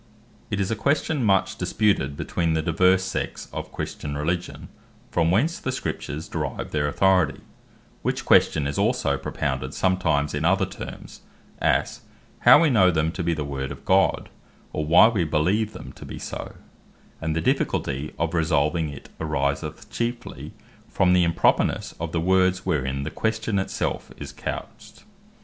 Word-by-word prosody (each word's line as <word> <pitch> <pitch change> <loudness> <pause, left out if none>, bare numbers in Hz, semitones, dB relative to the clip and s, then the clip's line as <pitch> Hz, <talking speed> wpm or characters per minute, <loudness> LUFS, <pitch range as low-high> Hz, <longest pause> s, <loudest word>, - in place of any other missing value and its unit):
It 100 - -2
is 100 +1 0
a - - +1
question 140 +3 0
much 95 -3 +2
disputed 100 -10 +1
between 85 -2 -1
the 80 - 0
divers 90 +3 +3
sects 95 - -4
of - - -5
Christian 70 -1 -5
Religion, 85 +4 -3 0.4
From 85 -1 +2
Whence 140 - +2
The 130 - -2
Scriptures 80 - -4
Derive - - -4
Their 75 -1 0
Authority; 95 +5 +2 0.6
which - - -2
question 75 -2 +4
is 70 0 -2
also - - +1
propounded 65 -1 -3
sometimes 85 -6 +1
in 75 +1 -2
other 95 +3 +3
terms, 95 - -9 0.4
as, - - +1 0.4
How - - +7
Wee 155 - +3
Know 95 -7 +5
Them 80 -2 +1
To 90 - -5
Be 85 -1 0
The 75 - -3
Word 70 -1 -4
Of 70 - -10
God, 95 0 +2 0.4
or, 75 -1 -2
Why 85 +7 +8
We 110 -6 +1
Beleeve 90 +8 +1
Them - - -9
To - - -12
Be - - -8
So: - - -6 0.7
and 80 -1 -1
the - - +1
difficulty 70 -2 -1
of 85 +1 -1
resolving 80 0 +1
it, 70 - -10
ariseth 70 -3 -2
chiefly 120 +1 -4 0.4
from 90 -1 +3
the 90 -1 +5
impropernesse 85 -1 +1
of 85 0 -4
the 85 - 0
words 95 +1 +2
wherein 70 -6 -1
the 75 - -4
question 110 -2 -1
it 95 - -2
self - - -3
is - - -7
couched. - - -7
85 Hz, 165 wpm, -24 LUFS, 75-95 Hz, 0.7 s, Why